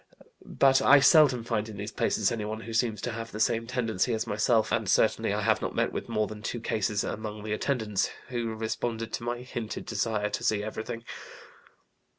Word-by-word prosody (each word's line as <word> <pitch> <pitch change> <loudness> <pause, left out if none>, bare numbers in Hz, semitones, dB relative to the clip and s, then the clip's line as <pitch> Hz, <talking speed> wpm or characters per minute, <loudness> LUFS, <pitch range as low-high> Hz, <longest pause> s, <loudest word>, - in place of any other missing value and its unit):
But 135 -1 +4
I 145 - +7
seldom 135 -4 +6
find 115 -2 -2
in 105 - -8
these 105 +2 -5
places 105 -3 +1
anyone 110 -1 -3
who 115 0 -7
seems 115 -3 0
to 120 - -2
have 115 0 -6
the 105 - -6
same 115 +1 +1
tendency 115 -2 0
as 110 +1 -2
myself, 110 +1 +1
and 110 -3 0
certainly - - +2
I - - -1
have - - +2
not - - -3
met - - +1
with - - -5
more 110 -2 +1
than 105 +1 -8
two 120 +3 -3
cases 105 -2 -1
among 105 -1 -5
the 105 0 -2
attendants, 110 -4 0 0.2
who 120 -3 -2
responded 115 +1 -3
to - - -3
my 120 +1 -3
hinted 120 -3 -5
desire 105 -1 -1
to - - -3
see 105 -1 +1
everything. 110 +2 -5
110 Hz, 195 wpm, -28 LUFS, 105-120 Hz, 0.2 s, I